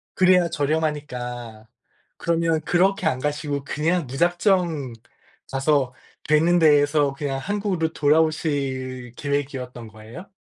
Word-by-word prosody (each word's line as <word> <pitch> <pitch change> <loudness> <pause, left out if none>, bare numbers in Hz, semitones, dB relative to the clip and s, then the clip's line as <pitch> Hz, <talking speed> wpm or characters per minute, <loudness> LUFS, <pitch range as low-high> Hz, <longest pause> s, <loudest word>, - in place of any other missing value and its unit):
그래야 180 -2 +4
저렴하니까 125 -8 -3 0.5
그러면 165 -1 0
그렇게 185 +2 +1
안 130 -5 +1
가시고 145 -1 -2
그냥 165 +3 -1
무작정 170 - +1 0.6
가서 135 -1 +1 0.3
되는 165 +3 +4
데서 145 -2 +4
그냥 135 -1 -3
한국으로 190 -1 -2
돌아오실 140 -5 0
계획이었던 135 -5 -4
거예요? 110 - -12
150 Hz, 270 characters per minute, -23 LUFS, 135-165 Hz, 0.6 s, 그래야